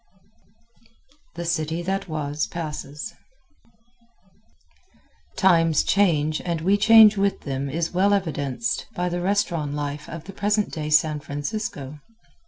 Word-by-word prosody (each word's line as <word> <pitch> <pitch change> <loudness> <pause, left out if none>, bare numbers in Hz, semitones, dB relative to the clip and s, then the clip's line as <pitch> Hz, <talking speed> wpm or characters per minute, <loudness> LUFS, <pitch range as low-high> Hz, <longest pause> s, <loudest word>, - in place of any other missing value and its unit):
The 170 0 -5
City 165 0 -1
That 195 +2 -2
Was 150 -1 -2
Passes 150 +2 -6 2.2
Times 165 -5 +4
change 155 -6 +2
and 170 -2 -2
we 190 +5 +3
change 215 0 +7
with 200 0 0
them 140 0 -3
is 165 +4 -2
well 190 +3 +3
evidenced 160 - -1
by 180 0 -1
the 175 0 -3
restaurant 175 -6 0
life 145 0 -5
of 165 -1 -7
the 195 - -10
present 205 +1 0
day 150 -1 -4
San 155 0 +3
Francisco. 145 - -5
165 Hz, 120 wpm, -23 LUFS, 150-195 Hz, 2.2 s, change